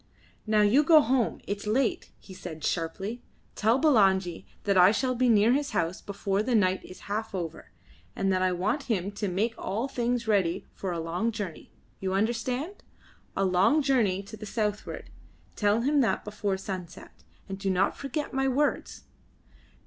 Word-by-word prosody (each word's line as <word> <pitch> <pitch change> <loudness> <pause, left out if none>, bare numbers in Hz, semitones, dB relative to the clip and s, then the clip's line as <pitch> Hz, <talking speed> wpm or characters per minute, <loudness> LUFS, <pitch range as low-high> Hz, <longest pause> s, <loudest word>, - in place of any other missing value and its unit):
"Now 215 -1 +4
you 220 +8 +5
go 315 +1 +7
home. 260 -4 +1
It 205 - -2
is 200 - -9
late," 240 +4 0
he 190 - -13
said 160 -4 -8
sharply. 190 +8 -2 0.3
"Tell 225 +3 +2
Bulangi 195 - +3 0.2
that 200 -1 +1
I 180 0 +7
shall 255 +4 0
be 250 0 +2
near 220 +1 +5
his 285 +2 -1
house 170 +2 -1
before 200 0 -2
the 240 +2 0
night 185 -3 +2
is 185 - -12
half 210 0 -4
over, 165 -3 -5 0.5
and 195 0 +1
that 185 - +1
I 185 0 +2
want 190 +11 -1
him 200 -3 0
to 205 0 -3
make 205 +6 0
all 220 +7 -2
things 240 -2 -1
ready 195 -6 +1
for 190 - -4
a 170 - -3
long 175 +8 -1
journey. 205 -7 -6 0.3
You 190 0 -2
understand? 245 - -2 0.5
A 195 - +2
long 190 +12 +3
journey 220 -9 +2
to 210 +2 -10
the 215 0 -9
southward. 210 -1 -3 0.4
Tell 210 +2 +2
him 285 +3 +3
that 235 - 0
before 205 -2 -2
sunset, 185 -3 -8 0.2
and 195 0 -6
do 195 -1 -1
not 190 +1 +2
forget 285 +2 -4
my 270 0 +1
words." 280 +3 -1
210 Hz, 175 wpm, -28 LUFS, 190-245 Hz, 0.5 s, go